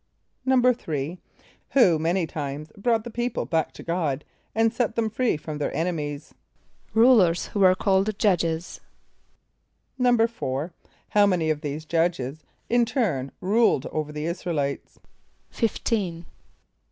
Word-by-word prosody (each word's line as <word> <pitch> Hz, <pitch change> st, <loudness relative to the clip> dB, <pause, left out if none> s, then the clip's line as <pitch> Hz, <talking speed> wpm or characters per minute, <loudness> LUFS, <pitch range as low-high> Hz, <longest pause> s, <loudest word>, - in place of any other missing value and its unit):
= 255 Hz, -, -29 dB
=3.= 205 Hz, -, +1 dB, 0.5 s
Who 185 Hz, -, +5 dB
many 170 Hz, +3 st, +1 dB
times 150 Hz, 0 st, -5 dB
brought 225 Hz, +1 st, +1 dB
the 240 Hz, -, -7 dB
people 240 Hz, +1 st, -2 dB
back 160 Hz, -2 st, 0 dB
to -, -, -11 dB
God, 160 Hz, -5 st, -1 dB, 0.3 s
and 225 Hz, 0 st, +3 dB
set 245 Hz, -3 st, -1 dB
them 225 Hz, -2 st, 0 dB
free 245 Hz, -6 st, +1 dB
from 150 Hz, 0 st, -6 dB
their 145 Hz, -, -1 dB
enemies? 150 Hz, -4 st, -3 dB, 0.6 s
=Rulers 220 Hz, -8 st, +5 dB
who 205 Hz, -, -3 dB
were 185 Hz, -1 st, +6 dB
called 195 Hz, +1 st, +1 dB
Judges.= 170 Hz, -5 st, 0 dB, 1.2 s
=4.= 225 Hz, -, +1 dB, 0.4 s
How 205 Hz, -1 st, +5 dB
many 170 Hz, -5 st, +1 dB
of 150 Hz, -1 st, -2 dB
these 150 Hz, 0 st, -4 dB
"judges" 160 Hz, -4 st, -1 dB, 0.2 s
in 240 Hz, 0 st, +3 dB
turn 185 Hz, -, -1 dB
ruled 205 Hz, -, +3 dB
over 155 Hz, -1 st, -3 dB
the 150 Hz, 0 st, -4 dB
[)I][s+]´ra 170 Hz, +2 st, -4 dB
el 165 Hz, -4 st, 0 dB
[=i]tes? 140 Hz, 0 st, -3 dB, 0.5 s
=Fifteen. 195 Hz, -6 st, -1 dB
175 Hz, 135 wpm, -25 LUFS, 155-225 Hz, 1.2 s, were